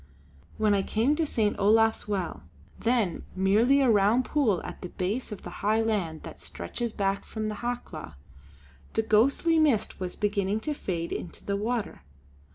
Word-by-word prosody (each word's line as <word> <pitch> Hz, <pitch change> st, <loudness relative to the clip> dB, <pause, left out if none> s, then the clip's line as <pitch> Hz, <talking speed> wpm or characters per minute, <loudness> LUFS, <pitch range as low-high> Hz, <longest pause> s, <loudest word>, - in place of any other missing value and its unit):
When 215 Hz, -1 st, +3 dB
I 200 Hz, -, +3 dB
came 230 Hz, +9 st, +1 dB
to 325 Hz, -2 st, +1 dB
St. 215 Hz, -6 st, +1 dB
Olaf's 220 Hz, +2 st, +3 dB
well 195 Hz, -5 st, -2 dB, 0.4 s
then 230 Hz, -6 st, +1 dB
merely 215 Hz, +9 st, +4 dB
a 255 Hz, -3 st, +4 dB
rough 210 Hz, +4 st, +4 dB
pool 245 Hz, -, +1 dB
at -, -, -8 dB
the 180 Hz, -, -6 dB
base 205 Hz, +9 st, -3 dB
of 205 Hz, -, -7 dB
the -, -, -7 dB
high 215 Hz, +2 st, +2 dB
land 190 Hz, -8 st, -1 dB
that -, -, -10 dB
stretches 235 Hz, -2 st, -5 dB
back 195 Hz, -1 st, -1 dB
from 215 Hz, -1 st, -4 dB
the 210 Hz, -, -4 dB
Hawklaw 235 Hz, -, -5 dB, 0.8 s
the 225 Hz, -, +1 dB
ghostly 275 Hz, +10 st, +3 dB
mist 275 Hz, -9 st, +2 dB
was 185 Hz, -1 st, -4 dB
beginning 205 Hz, 0 st, 0 dB
to 300 Hz, -, -2 dB
fade 170 Hz, -, -3 dB
into 170 Hz, -, -6 dB
the 200 Hz, -, 0 dB
water. 220 Hz, +2 st, -2 dB
215 Hz, 165 wpm, -28 LUFS, 195-240 Hz, 0.8 s, merely